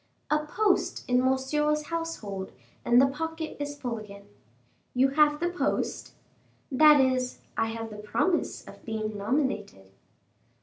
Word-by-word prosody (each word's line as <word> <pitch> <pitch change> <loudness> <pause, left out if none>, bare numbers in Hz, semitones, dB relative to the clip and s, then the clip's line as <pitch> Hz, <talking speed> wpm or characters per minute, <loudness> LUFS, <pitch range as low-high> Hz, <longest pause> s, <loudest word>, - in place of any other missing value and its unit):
"A 300 0 +2
post 415 +4 +1
in 250 0 +3
Monsieur's 300 +4 +1
household, 230 - -4 0.3
and 240 +1 +5
the 265 - +7
pocket 320 +3 -4
is 290 0 -5
full 240 -4 -3
again." 200 -1 -11 0.7
"You 260 +2 +4
have 295 +1 +3
the 345 - 0
post?" 360 - -2 0.6
"That 300 +2 +7
is, 255 -1 +1 0.2
I 225 - +1
have 225 0 -5
the 210 - -8
promise 225 - -1
of - - -13
being 215 -1 -3
nominated." 205 - -2
265 Hz, 135 wpm, -28 LUFS, 220-300 Hz, 0.7 s, the